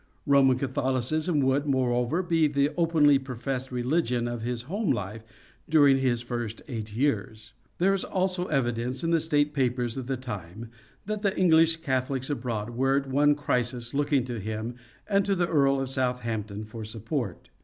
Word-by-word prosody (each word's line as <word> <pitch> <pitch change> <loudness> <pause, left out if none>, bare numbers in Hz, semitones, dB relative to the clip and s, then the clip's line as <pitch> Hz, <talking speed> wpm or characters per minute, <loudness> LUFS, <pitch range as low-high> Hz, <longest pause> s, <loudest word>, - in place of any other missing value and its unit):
Roman 135 -3 +5
Catholicism 135 +5 0
would, 135 +2 +1
moreover, 130 +4 +1
be 165 -3 +2
the 140 0 +1
openly 160 -5 +4
professed 130 0 -4
religion 125 -1 0
of 120 -1 -4
his 120 0 -3
home 195 - -2
life 105 -2 -3 0.5
during 145 -3 +5
his 120 -3 0
first 120 -2 -5
eight 110 -5 -6
years. 110 -4 -1 0.2
There 190 +3 +3
is 195 - 0
also 185 -1 -1
evidence 125 -1 -1
in 165 - 0
the 165 - +4
State 150 -2 +1
Papers 125 -3 0
of 130 -2 -5
the 135 -1 -1
time 110 -2 -7 0.3
that 215 0 -3
the 200 -2 0
English 165 -2 +4
Catholics 130 -1 -1
abroad 120 -5 -3
were 135 +3 +1
at 140 -1 -2
one 145 +2 +4
crisis 125 -4 -2
looking 145 -2 +1
to 120 -2 -5
him 110 +3 -4 0.3
and 200 -1 +3
to 195 0 +1
the 175 -1 +1
Earl 140 -4 +3
of 135 - -2
Southampton 115 -5 -2
for 110 +1 -8
support. 110 - -4
130 Hz, 165 wpm, -27 LUFS, 120-150 Hz, 0.5 s, Roman